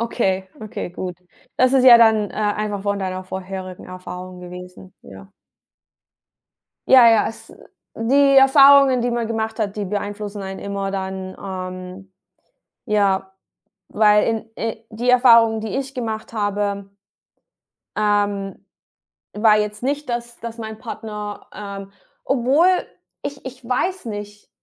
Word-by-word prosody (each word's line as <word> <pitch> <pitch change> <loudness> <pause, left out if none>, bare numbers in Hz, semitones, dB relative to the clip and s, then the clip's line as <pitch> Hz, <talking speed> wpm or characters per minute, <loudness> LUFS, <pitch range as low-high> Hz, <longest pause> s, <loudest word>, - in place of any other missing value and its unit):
Okay, 190 -5 -1
okay, 215 -4 -6
gut. 180 0 -6 0.4
Das 255 +1 +3
ist 260 -1 +4
ja 240 -2 +10
dann, 220 -3 +4
äh, - - -12
einfach 210 -1 -2
von 200 0 -1
deiner 185 -1 -4
vorherigen 185 0 -7
Erfahrung 185 0 -9
gewesen, 180 +1 -11
ja. 95 0 -13 1.6
Ja, 250 -3 +8
ja, 225 -2 +4
es 225 - -11 0.4
die 275 +4 +3
Erfahrungen, 275 -1 +7
die 245 - 0
man 235 -1 -1
gemacht 220 0 -3
hat, 205 -2 -2
die 205 - -2
beeinflussen 205 +1 -5
einen 190 0 -6
immer 200 -1 -4
dann, 190 -1 -5
ähm, 185 0 -8 0.7
ja, 195 -4 0 0.6
weil 210 0 +4
in, 225 0 -2
äh 225 -1 -3
die 235 +3 -4
Erfahrung, 230 -3 +5
die 220 +2 -4
ich 270 0 -4
gemacht 220 -3 -5
habe 205 -2 -2 1.1
ähm, 205 -2 -1 0.7
war 215 0 +4
jetzt 210 +1 -3
nicht, 285 0 -2
dass 235 0 -4
dass 230 0 -7
mein 220 -1 -7
Partner, 210 -3 -7
ähm 200 -1 -8 0.3
obwohl 270 +6 +3 0.6
ich 280 -1 -6
ich 260 0 -9
weiß 365 +7 -1
nicht 205 -1 -8
210 Hz, 130 wpm, -21 LUFS, 195-235 Hz, 1.6 s, ja